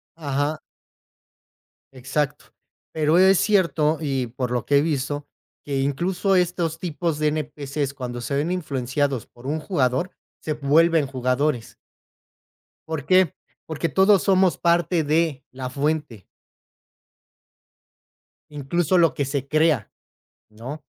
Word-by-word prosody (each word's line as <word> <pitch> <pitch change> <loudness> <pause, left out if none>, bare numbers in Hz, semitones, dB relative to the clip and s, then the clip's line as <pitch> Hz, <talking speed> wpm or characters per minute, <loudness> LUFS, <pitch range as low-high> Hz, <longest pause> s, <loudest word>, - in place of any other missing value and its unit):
Ajá. 145 -1 -2 1.3
Exacto, 135 +3 -2 0.5
pero, 155 +1 +2
es 190 0 +6
cierto, 165 -6 +2
y 135 -5 -1
por 125 +1 -4
lo 120 -2 -1
que 145 - +3
he - - +5
visto, 145 -1 -2 0.4
que 140 -2 -2
incluso 180 +8 0
estos 175 -2 0
tipos 165 -2 -2
de 155 0 +1
NPC's, 145 -2 -3
cuando 120 -2 -5
se 130 +4 -3
ven 150 +5 0
influenciados 140 -6 -1
por 120 +2 -13
un 155 +3 -1
jugador, 150 0 0 0.3
se 155 - -3
vuelven 155 +1 +3
jugadores. 130 -1 -1 1.1
¿Por 160 -4 -4
qué? 185 -2 +4 0.3
Porque, 160 +1 -3
todos 195 0 +4
somos 190 -2 +3
parte 170 -1 +2
de 155 -2 0
la 130 0 -6
fuente. 140 - -2 2.2
Incluso 150 +5 0
lo 165 -5 +4
que 140 - -1
se 135 0 -3
crea, 155 -7 +2 0.6
¿no? 120 +8 -8
150 Hz, 120 wpm, -23 LUFS, 135-165 Hz, 2.2 s, es